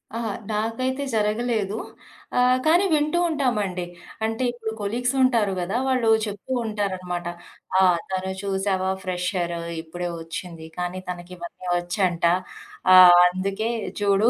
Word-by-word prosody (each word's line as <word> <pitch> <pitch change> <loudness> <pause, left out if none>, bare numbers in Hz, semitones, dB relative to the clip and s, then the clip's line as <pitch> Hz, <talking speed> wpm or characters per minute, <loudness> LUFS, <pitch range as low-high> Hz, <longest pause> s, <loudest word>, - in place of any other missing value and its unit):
అహా! 230 -2 -2 0.2
నాకైతే 255 +6 -1
జరగలేదు. 215 -1 0 0.6
ఆహ్, 250 +1 +4
కానీ 340 +4 +5
వింటూ 305 +3 +2
ఉంటామండి. 210 - -1 0.4
అంటే 225 +3 -2
ఇప్పుడు 225 -2 -5
కొలీగ్స్ 245 +6 -1
ఉంటారు 230 -6 +3
గదా! 190 +6 -1
వాళ్ళు 250 -4 +2 0.2
చెప్తూ 205 +4 -7
ఉంటారన్నమాట. 185 -5 -3 0.5
"ఆ! - - +6 0.3
తను 190 0 -2
చూశావా, 190 -1 0
ఫ్రెషర్ 180 -1 -2 0.3
ఇప్పుడే 175 +2 -5
ఒచ్చింది. 165 0 -7
కానీ, 180 +1 -3
తనకి 175 0 -6
ఇవన్నీ 175 +1 -9
వచ్చంట. 175 -1 0 0.7
ఆహ్, 180 -1 +10
అందుకే 195 +4 -2 0.3
చూడు 205 +2 +3
200 Hz, 115 wpm, -24 LUFS, 180-230 Hz, 0.7 s, ఆహ్